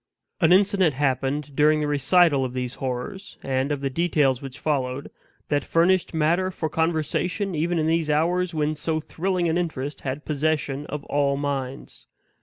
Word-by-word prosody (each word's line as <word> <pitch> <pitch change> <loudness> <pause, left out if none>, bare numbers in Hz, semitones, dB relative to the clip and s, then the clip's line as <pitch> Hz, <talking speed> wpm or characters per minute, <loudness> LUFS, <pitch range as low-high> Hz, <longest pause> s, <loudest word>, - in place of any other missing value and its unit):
An 165 -3 +4
incident 190 - +4
happened 135 +1 -1
during 150 +1 +4
the 150 - 0
recital 145 0 +3
of 125 -1 -3
these 125 -1 -3
horrors, 130 +9 -5
and 135 +1 -1
of 145 -1 -2
the 135 - -1
details 145 -4 +1
which 135 -1 -8
followed, 135 -3 -2 0.4
that 145 -2 +1
furnished 175 +2 +2
matter 170 +4 +1
for 160 -4 -3
conversation 170 +5 -1
even 170 +2 0
in 155 - +1
these 160 -1 +1
hours 175 +4 +1
when 155 -2 0
so 155 +1 -1
thrilling 180 +3 -1
an 165 +2 +1
interest 150 -4 -4
had 135 +2 -4
possession 150 -1 -1
of 150 -1 -5
all 140 -1 0
minds. 140 -2 -5
150 Hz, 165 wpm, -24 LUFS, 140-170 Hz, 0.4 s, An